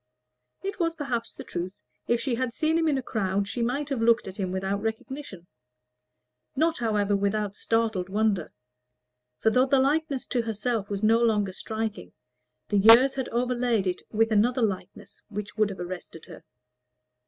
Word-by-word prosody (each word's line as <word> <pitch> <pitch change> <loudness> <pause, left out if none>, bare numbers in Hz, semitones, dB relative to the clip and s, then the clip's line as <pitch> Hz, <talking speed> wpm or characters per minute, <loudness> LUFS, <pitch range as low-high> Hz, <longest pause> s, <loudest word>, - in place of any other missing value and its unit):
It 395 0 -4
was 330 -1 0
perhaps 250 -7 -3
the - - -9
truth. 180 +2 -6 0.2
If 235 - +2
she 265 -1 -1
had 245 0 -1
seen 315 +4 +1
him 325 - +1
in 290 -3 +2
a 265 - -3
crowd, 200 -3 -1
she 235 +4 -3
might 275 +5 -1
have 270 -5 -1
looked 230 -2 +3
at 190 - -8
him 190 -3 -2
without 190 +2 -2
recognition 220 -3 -5 1.1
not, 320 +2 +1
however, 210 -3 +1
without 200 0 -1
startled 220 -6 0
wonder; 205 -4 0 0.9
for 220 - +2
though 255 +3 +4
the 275 - +4
likeness 280 0 +1
to 245 - 0
herself 225 -1 -2
was 200 0 -3
no 225 +2 +5
longer 210 -5 +2
striking, 220 - -5 0.6
the 205 - +2
years 230 +6 +8
had 265 -2 -3
overlaid 240 -3 0
it 180 -1 -2
with 225 +1 +1
another 235 +4 +3
likeness 190 -3 -4
which 210 -1 -6
would 215 -1 +2
have 195 - -7
arrested 175 -2 -7
her. 170 -4 -12
225 Hz, 170 wpm, -27 LUFS, 200-250 Hz, 1.1 s, years